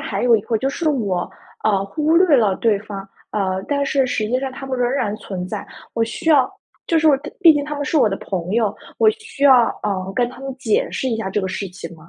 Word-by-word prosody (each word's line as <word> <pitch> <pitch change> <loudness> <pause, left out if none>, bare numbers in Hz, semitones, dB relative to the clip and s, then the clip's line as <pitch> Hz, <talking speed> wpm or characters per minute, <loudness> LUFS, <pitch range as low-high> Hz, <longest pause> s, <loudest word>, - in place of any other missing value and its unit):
还 200 +3 -2
有 235 -2 +6
一 - - -1
个 225 +2 -1
就 265 - 0
是 315 +4 -1
我， 205 -10 -1 0.3
呃， 200 -2 +2
忽 305 +10 +1
略 340 -5 +5
了 205 -5 +2
对 220 -3 +2
方。 195 -2 -8 0.2
呃， 190 -2 -1
但 280 -1 0
是 275 -2 +2
实 215 - -1
际 250 +3 0
上 270 0 -3
他 270 +1 -8
们 265 -1 -2
仍 245 -1 +1
然 220 -6 -1
存 185 -4 -6
在。 - - -5 0.3
我 230 - 0
需 225 +8 -3
要 275 -5 +4 0.4
就 330 - +3
是 315 - +2
我 295 -3 +6
他 300 +2 -9
毕 330 - +8
竟 290 -1 -1
他 300 0 -5
们 285 - -3
是 310 - -1
我 240 -7 +5
的 195 - -2
朋 180 -3 -4
友， 220 -2 +1 0.2
我 440 - +5
需 440 -10 -5
要， 255 -4 +7 0.2
呃， 190 -2 -2
跟 245 -1 +2
他 255 - -12
们 270 0 -5
解 225 -5 0
释 260 - -2
一 230 - -1
下 220 -4 -3
这 205 - 0
个 190 - -2
事 195 +1 -4
情 175 -2 -9
吗？ 160 +1 -17
235 Hz, 285 characters per minute, -20 LUFS, 200-280 Hz, 0.4 s, 毕